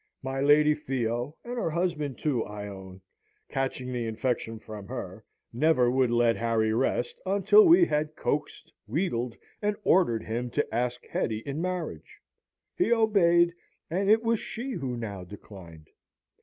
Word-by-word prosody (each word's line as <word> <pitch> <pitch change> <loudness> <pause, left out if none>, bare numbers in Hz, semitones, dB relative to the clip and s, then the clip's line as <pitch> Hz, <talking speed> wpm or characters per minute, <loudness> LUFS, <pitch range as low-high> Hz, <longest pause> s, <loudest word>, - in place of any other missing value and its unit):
My 135 +1 -3
Lady 150 +2 +5
Theo, 125 -1 -3
and 245 +1 -6
her 165 - 0
husband 155 -5 -2
too, 135 -7 0
I 105 0 -7
own, 95 -1 -10 0.5
catching 130 -1 -3
the 120 -2 -2
infection 115 0 -2
from 105 -2 -9
her, 110 -5 -7 0.3
never 125 -2 +3
would 130 -1 +2
let 120 -1 +3
Harry 115 -1 +1
rest, 120 0 -1
until 200 - +5
we 345 +1 +7
had 150 - -1
coaxed, 150 -1 -3
wheedled, 120 - -2 0.2
and 210 0 0
ordered 120 -12 +3
him 120 +3 -3
to 145 - +2
ask 125 +1 -2
Hetty 110 0 -2
in 140 +3 -3
marriage. 180 -1 -5 0.6
He 360 - +1
obeyed, 175 -7 +4 0.4
and 195 +4 0
it 220 +2 +5
was 230 -1 +1
she 245 +4 -5
who 130 - -3
now 100 -5 -5
declined. 90 -4 -12
130 Hz, 150 wpm, -28 LUFS, 115-170 Hz, 0.6 s, we